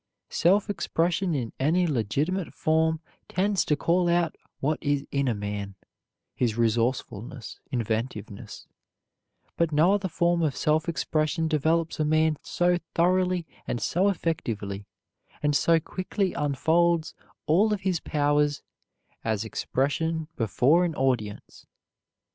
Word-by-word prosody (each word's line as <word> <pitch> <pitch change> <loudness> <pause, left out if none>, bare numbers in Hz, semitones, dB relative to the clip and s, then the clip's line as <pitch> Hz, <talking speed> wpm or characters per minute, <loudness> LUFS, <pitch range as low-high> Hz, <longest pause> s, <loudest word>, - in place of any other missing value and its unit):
Self 195 +5 +3
expression 175 -2 0
in 120 -5 -3
any 165 +7 +2
legitimate 150 - -1
form 160 0 +1 0.3
tends 195 +1 +1
to 150 - +2
call 175 +3 +2
out 170 -1 +1 0.2
what 150 +3 0
is 145 -1 0
in 140 -1 0
a 120 - +1
man, 100 -1 -4 0.6
his 120 -3 0
resourcefulness, 115 0 -1
inventiveness; 110 -3 -4 0.9
but 170 -1 +1
no 160 +6 +4
other 200 -2 0
form 170 0 +1
of 150 -5 0
self 155 +2 +1
expression 160 0 0
develops 160 +2 +1
a - - +3
man 155 0 +2
so 175 0 +1 0.2
thoroughly 180 0 +2 0.2
and 120 - -2
so 185 +10 +2
effectively, 105 - -3 0.6
and 150 -1 +2
so 165 +2 +4
quickly 185 +3 -2
unfolds 160 +3 +1 0.3
all 190 +8 +3
of 210 -2 -1
his 185 -3 0
powers, 145 -1 +1 0.6
as 110 -1 -1
expression 155 +7 -1
before 125 - +3
an 170 -3 -1
audience. 120 -6 -2
155 Hz, 125 wpm, -26 LUFS, 130-170 Hz, 0.9 s, no